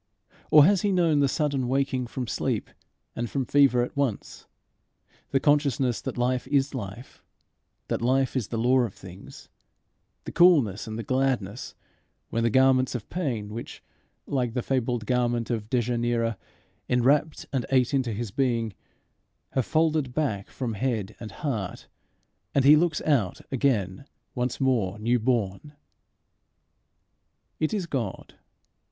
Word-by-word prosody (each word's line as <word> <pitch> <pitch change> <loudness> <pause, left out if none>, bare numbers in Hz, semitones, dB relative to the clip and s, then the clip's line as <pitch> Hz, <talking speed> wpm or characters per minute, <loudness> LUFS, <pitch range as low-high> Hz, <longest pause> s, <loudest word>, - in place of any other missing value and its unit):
Or 150 -1 +8
has 195 0 +3
he 205 - +1
known 170 -5 +3
the 140 - +4
sudden 140 -2 -1
waking 130 -1 0
from 125 +1 -4
sleep 110 - -2 0.4
and 120 0 -3
from 135 -2 -2
fever 135 -2 +4
at 125 - -6
once, 140 -7 -3 0.8
the 135 - +2
consciousness 140 -4 +1
that - - -5
life 125 +1 0
is 140 0 +1
life, 115 0 -8 0.7
that - - -2
life 130 +2 +1
is 120 -6 -1
the 115 - -4
law 125 +3 +3
of 120 -6 -1
things, 95 +1 -12 0.8
the - - -7
coolness 145 - +4
and 110 0 -5
the 115 - -4
gladness, 130 -4 -1 0.6
when 115 - 0
the 115 - +2
garments 130 +1 +3
of 115 - -6
pain 125 - -2
which, 115 +3 -8 0.4
like 125 -4 -2
that 125 - -1
fabled 125 -3 -1
garment 120 0 0
of 110 -2 -3
Dejanira, 120 -1 0 0.5
enwrapped 140 +5 +2
and 130 -3 -1
ate 130 0 +2
into 130 -4 +1
his 110 0 -4
being, 115 -3 0 0.8
have 130 -3 -1
folded 155 -5 +1
back 110 -11 -1
from 125 -4 -4
head 110 -3 -2
and 110 -3 -8
heart, 110 -7 -4 0.7
and 135 -2 +3
he 145 +2 +9
looks 160 0 +1
out 120 - +1
again 120 -6 0 0.3
once 125 -1 -2
more 115 -7 +1
new 120 +3 +1
born? 115 +3 -1 1.9
It 155 - 0
is 200 -4 -1
God. 125 - -4
125 Hz, 145 wpm, -26 LUFS, 115-140 Hz, 1.9 s, he